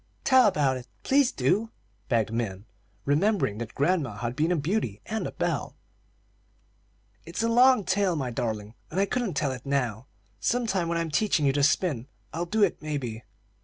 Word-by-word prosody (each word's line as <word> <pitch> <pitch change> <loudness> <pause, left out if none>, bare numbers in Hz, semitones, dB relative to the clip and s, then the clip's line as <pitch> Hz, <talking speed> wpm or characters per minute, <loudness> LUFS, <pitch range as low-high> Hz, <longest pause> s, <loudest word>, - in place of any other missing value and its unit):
"Tell 260 -3 +6
about 140 -8 +2
it, 125 0 -10 0.2
please 275 -2 +3
do," 195 - +1 0.4
begged 115 -2 +1
Min, 105 -4 -3 0.4
remembering 150 - +1
that 115 -2 -6
grandma 145 - +1
had 120 +3 -4
been 160 +5 +1
a - - +3
beauty 150 - -1
and 220 0 -2
a - - -6
belle. - - -2 1.5
"It's - - -4
a - - +2
long 245 0 +5
tale, 185 0 +1
my 130 -5 -2
darling, 110 -2 -3 0.2
and 180 - -2
I 200 - +4
couldn't 230 - -2
tell 140 -1 0
it 125 -2 -7
now. 130 -4 -1 0.3
Sometime 215 -8 0
when 170 0 0
I'm 165 -1 -2
teaching 165 -4 +2
you 135 - +3
to 145 - +1
spin 145 -4 +1 0.3
I'll 170 +2 -2
do 215 +4 +2
it, 195 - +1
maybe." 130 -8 -4
150 Hz, 175 wpm, -27 LUFS, 120-200 Hz, 1.5 s, Tell